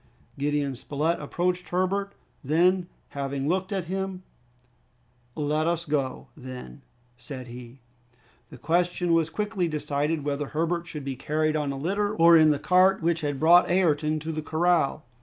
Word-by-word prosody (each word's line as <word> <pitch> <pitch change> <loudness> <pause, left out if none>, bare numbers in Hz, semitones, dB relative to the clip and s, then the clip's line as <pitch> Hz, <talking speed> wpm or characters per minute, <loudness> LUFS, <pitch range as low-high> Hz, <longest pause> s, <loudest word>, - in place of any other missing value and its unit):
Gideon 145 -1 0
Spilett 150 +6 -1
approached 180 +4 -2
Herbert; 195 +2 -1 0.3
then, 175 +5 +2 0.2
having 140 0 -3
looked 185 +4 -1
at 190 -3 -2
him, 190 +1 -4 1.1
"Let 150 +1 0
us 170 0 -1
go, 140 -4 -2
then!" 125 - -9 0.4
said 125 0 -8
he. 120 +1 -11 0.7
The - - -11
question 175 +1 0
was 165 -1 +2
quickly 205 -1 -2
decided 150 0 -2
whether 145 0 -2
Herbert 170 +3 -2
should 150 -4 -7
be 135 -1 -3
carried 155 +3 -1
on 150 -2 -1
a 135 - -5
litter 200 +8 -1
or 170 0 +7
in 155 -1 +6
the 150 - +2
cart 185 +3 +3
which 170 0 +1
had 145 -3 -2
brought 170 +3 +6
Ayrton 155 -4 +2
to 160 +2 -4
the 155 0 -3
corral. 160 -2 +1
160 Hz, 155 wpm, -26 LUFS, 145-175 Hz, 1.1 s, or